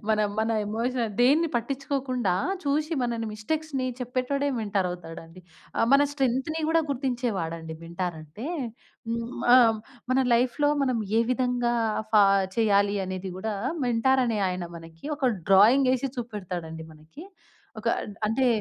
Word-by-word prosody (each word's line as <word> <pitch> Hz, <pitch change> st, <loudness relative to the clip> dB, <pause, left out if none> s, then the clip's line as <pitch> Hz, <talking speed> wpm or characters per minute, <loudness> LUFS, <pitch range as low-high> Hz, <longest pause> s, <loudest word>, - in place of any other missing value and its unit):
మన 215 Hz, -1 st, +3 dB, 0.2 s
మన 220 Hz, +1 st, +1 dB, 0.2 s
ఎమోషన్ 230 Hz, +1 st, -1 dB
దేన్ని 295 Hz, +7 st, +4 dB
పట్టించుకోకుండా 260 Hz, -4 st, -1 dB, 0.3 s
చూసి 300 Hz, +3 st, 0 dB
మనల్ని 235 Hz, -2 st, -2 dB
మిస్టేక్స్‌ని 275 Hz, +5 st, -2 dB
చెప్పేటోడే 255 Hz, +3 st, -1 dB
మెంటార్ 200 Hz, -3 st, 0 dB
అవుతాడండి. 165 Hz, 0 st, -9 dB, 0.4 s
ఆహ్, -, -, +3 dB
మన 280 Hz, +1 st, +6 dB
స్ట్రెంగ్త్‌ని 270 Hz, +3 st, -1 dB
కూడా 330 Hz, 0 st, +3 dB
గుర్తించేవాడండి 205 Hz, -, -2 dB
మెంటార్ 170 Hz, +1 st, -4 dB
అంటే. 160 Hz, -, -9 dB, 0.6 s
హ్మ్. 230 Hz, 0 st, -2 dB, 0.2 s
ఆ! -, -, +10 dB, 0.6 s
మన 260 Hz, -, +3 dB, 0.2 s
లైఫ్‌లో 255 Hz, +5 st, +2 dB
మనం 255 Hz, -3 st, +1 dB, 0.2 s
ఏ -, -, +5 dB
విధంగా 245 Hz, -1 st, +1 dB, 0.4 s
ఫా 210 Hz, -2 st, +7 dB, 0.3 s
చేయాలి 205 Hz, -2 st, +3 dB
అనేది 185 Hz, 0 st, -4 dB
కూడా 215 Hz, +2 st, -3 dB, 0.3 s
మెంటార్ 255 Hz, +3 st, +3 dB
అనే 225 Hz, -3 st, 0 dB
ఆయన 180 Hz, -1 st, -3 dB
మనకి 165 Hz, 0 st, -13 dB
ఒక 280 Hz, -3 st, 0 dB, 0.2 s
డ్రాయింగ్ 230 Hz, +8 st, +6 dB
ఏసి 265 Hz, +2 st, -2 dB
చూపెడతాడండి 180 Hz, -9 st, -5 dB
మనకి. 155 Hz, -, -13 dB, 0.6 s
ఒక 230 Hz, -, -1 dB, 0.4 s
అంటే 230 Hz, +5 st, +1 dB
235 Hz, 130 wpm, -26 LUFS, 190-265 Hz, 0.6 s, ఆ